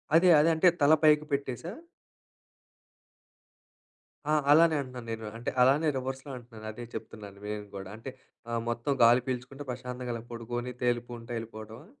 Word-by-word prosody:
అదే 180 +2 +6
అదే 155 +3 +5
అంటే, 160 +3 +4
తల 145 +2 +6
పైకి 150 0 +5
పెట్టేసా? 140 +4 -3 2.6
ఆ! - - +3 0.2
అలానే 160 +1 +6
అంటున్నాను 125 -3 -7
నేను. 110 0 -5
అంటే 120 - -3
అలానే 140 +5 +4
రివర్స్‌లో 130 +2 -5
అంటున్నాను. 115 -3 -12
అదే 120 +2 -8
చెప్తున్నాను 105 -3 -8
నేను 105 0 -4
కూడా. 95 -1 -7
అంటే, 115 +4 -8 0.4
ఆహ్, 115 0 -1
మొత్తం 120 +4 -1
గాలి 120 +2 +6
పీల్చుకుంటే 130 +2 -4
ప్రశాంతంగా 125 0 -5
అలా 115 - -6
పడుకొని, 120 +2 -4
తేలిపుంటా 120 -1 -2
ఎళ్ళిపోవటమా? 110 +3 -9
120 Hz, 140 wpm, -29 LUFS, 115-140 Hz, 2.6 s, అదే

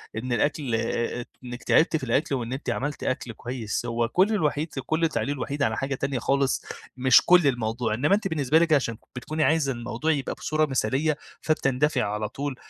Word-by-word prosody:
إن 120 +3 -3
الأكل 140 -1 0
آآ، 120 +1 -2 0.2
إنِّك 125 0 -7
تعبتِ 160 0 +3
في - - -8
الأكل 135 +3 +1
وإن 120 0 -3
أنتِ 135 - -4
عملت 145 +2 -3
أكل 130 -2 -2
كويس، 120 -1 -4
هو 115 0 0
كُلّ 185 - +3
الوحيد 155 -4 0
في 135 - -3
كُلّ 160 +4 +1
تعليقُه 145 -2 -1
الوحيد 140 +2 -3
على 110 0 0
حاجة 135 +1 -2
تانية 135 -1 -2
خالص، 135 +1 0 0.3
مش 130 0 +6
كُلّ 180 -4 +6
الموضوع، 115 -2 -1
إنّما 145 - +3
أنتِ 205 -1 -2
بالنسبة 155 -2 +2
لِك 165 -2 +3
عشان 115 -6 +1 0.2
بتكوني 155 +5 -2
عايزة 155 -4 +2
الموضوع 120 +5 -2
يبقى 140 -3 -1
بصورة 155 +1 0
مثالية، 140 +3 0 0.2
فبتندفعي 135 -3 +1
على 105 +1 -2
طول، 140 +3 -4
135 Hz, 190 wpm, -25 LUFS, 120-150 Hz, 0.3 s, مش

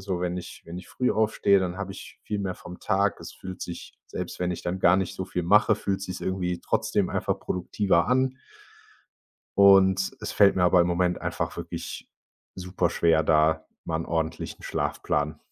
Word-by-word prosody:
so, 95 -2 -3
wenn 90 0 -1
ich 90 -1 -8
wenn 85 +1 -7
ich 90 - -11
früh 125 - 0
aufstehe, 105 -2 +3
dann 90 -1 -2
habe 100 -1 -5
ich 95 - -11
viel 105 - -3
mehr 95 -2 -2
vom 90 0 -11
Tag. 100 +1 +1
Es - - -9
fühlt 95 -1 -9
sich, 85 - -7
selbst - - -6
wenn 90 0 -1
ich 85 - -6
dann 90 +2 -2
gar 95 0 +5
nicht 95 -2 -2
so 95 - -3
viel 90 -1 -3
mache, 105 +5 +5
fühlt’s 100 -1 -2
sich 90 - -6
irgendwie 90 -2 -2
trotzdem - - 0
einfach - - -1
produktiver 90 -1 0
an. 130 +1 +1 1.2
Und 95 -1 +6
es - - -5
fällt 100 -1 +5
mir 90 - +2
aber 90 0 +5
im 85 - +1
Moment 90 0 0
einfach - - -3
wirklich - - -6 0.5
super 90 -1 -1
schwer, 80 -1 +3
da 80 +1 +3 0.2
mal 80 - -1
'n 85 - -4
ordentlichen 80 -1 -3
Schlafplan 75 +1 -2
90 Hz, 190 wpm, -26 LUFS, 85-100 Hz, 1.2 s, Und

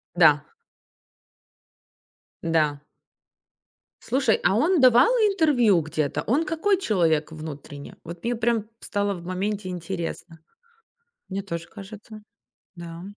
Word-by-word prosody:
Да. 150 -4 +5 2.0
Да. 155 -3 +1 1.2
Слушай, 255 -4 +1
а 195 - +3
он 330 +6 +3
давал 250 0 +7
интервью 310 - +3
где-то? 155 -2 -2
Он 290 +8 +2
какой 335 +6 +1
человек 165 - +1
внутренне? 150 -2 -9
Вот 170 +4 -10
мне 240 +1 0
прямо 230 -1 0 0.2
стало 205 -1 -1
в 175 -1 -9
моменте 190 +2 -3
интересно. 170 -2 -5 0.9
Мне 195 +1 -3
тоже 170 -3 -6
кажется. 215 +1 -11 0.5
Да. 170 0 -9
190 Hz, 105 wpm, -24 LUFS, 165-235 Hz, 2.0 s, давал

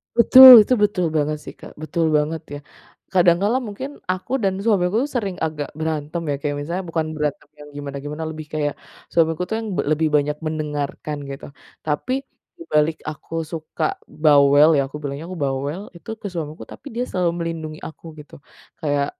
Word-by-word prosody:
Betul, 250 0 +11
itu 255 - +1
betul 180 -3 +1
banget 150 0 0
sih - - -9
Kak. - - -11
Betul 165 +1 -1
banget 155 +2 -1
ya, - - -7 0.5
kadang 175 -2 +5
kala 220 +5 +2
mungkin 235 +7 -6 0.2
aku 185 +5 -6
dan 195 -1 +2
suamiku 200 -2 +2 0.2
sering 200 -6 -1
agak 150 -2 -4
berantem 155 +1 -3
ya - - 0
kayak 145 -1 -2
misalnya 175 +5 -3
bukan 160 -1 -1
berantem 150 -2 -3
yang 150 0 -11
gimana-gimana 145 +2 -6
lebih 155 -1 -8
kayak 145 -2 -1 0.4
suamiku 165 +1 +2
tuh 220 - -1
yang 225 -1 -5 0.2
lebih 155 +1 +2
banyak 150 0 +1
mendengarkan 150 -1 -4
gitu. 135 0 -7 0.4
Tapi 155 +12 -1 0.5
dibalik 155 - +1
aku 155 +1 -10 0.2
suka 160 -2 -5 0.4
bawel 145 0 +6
ya, - - +3
aku 140 - -8
bilangnya 145 +2 -5
aku 185 - -6
bawel 140 +6 -3 0.2
itu 170 - -14
ke 205 - -4
suamiku, 155 -2 -5
tapi - - -11
dia 245 - 0
selalu 180 -2 0
melindungi 160 -2 -5
aku 160 - -18
gitu. 150 - -13 0.5
Kayak 145 -2 +1
155 Hz, 170 wpm, -21 LUFS, 150-180 Hz, 0.5 s, Betul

